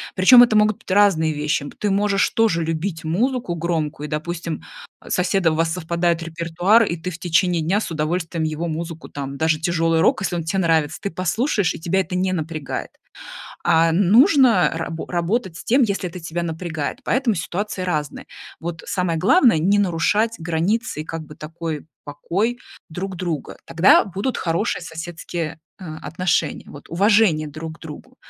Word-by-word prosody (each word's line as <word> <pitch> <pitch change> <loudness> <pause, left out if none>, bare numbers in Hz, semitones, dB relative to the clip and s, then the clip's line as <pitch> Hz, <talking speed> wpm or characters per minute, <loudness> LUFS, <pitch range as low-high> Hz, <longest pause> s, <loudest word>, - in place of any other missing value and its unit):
Причем 220 +7 +8
это 240 -3 +5
могут 210 -1 +3
быть - - -17
разные 185 -6 +3
вещи. 150 -1 -1
Б - - -10
ты 205 - -1
можешь 200 0 +2
тоже 215 -7 +2
любить 165 +2 -3
музыку 230 +5 -1
громкую, 160 -3 -3
допустим, 165 +1 -4 0.4
с - - -2
соседом 180 -2 +2
у - - -3
вас 165 0 +1
совпадает 170 -1 -1
репертуар 170 +6 +2
и 170 -4 -2
ты 180 +3 -5
в 165 - -9
течение 175 0 +1
дня 185 +6 +1
с 215 - -5
удовольствием 165 +1 -2
его 155 +2 -2
музыку, 165 0 -5
там 140 -1 -6
даже 155 0 +1
тяжелый 165 -1 +1
рок, 205 - +3
если 180 - -1
он 170 - -2
те 180 +4 -1
нравится, 160 -3 +1
ты 200 - -4
послушаешь, 190 - 0
и - - -8
тебя 175 +3 0
это 180 0 -2
не 185 0 0
напрягает. 155 -4 -4 0.8
А 165 +1 +4
н 180 +3 +2
нужно 260 - +5
рабо 165 0 -4
работать 180 +1 -1
с - - -10
тем, 260 +4 +3
если 200 -5 0
это 180 - -9
тебя 165 +1 -4
напрягает, 165 - -4
поэтому 255 -4 +1
ситуации 185 +3 -3
разные. 155 -6 -3 0.4
Вот 165 0 -5
самое 180 -3 -1
главное- 225 - +4
не 195 +6 +2
нарушать 205 +5 +1
границы 170 +4 -1
и - - -13
как 165 0 -6
бы 150 - -12
такой 160 -1 -6 0.2
покой 200 - -2 0.3
друг 185 +3 -5
друга. 170 -5 -4
Тогда 170 +4 +5
будут 200 +7 -3
хорошие 170 +6 -1
соседские, 165 -1 -6 0.2
э, 185 - -8 0.2
отношения, 165 -3 -1
вот, 145 - -12
уважение 190 -3 +3
друг 160 +2 -8
к - - -31
другу. 160 +12 -11
170 Hz, 175 wpm, -21 LUFS, 160-195 Hz, 0.8 s, Причем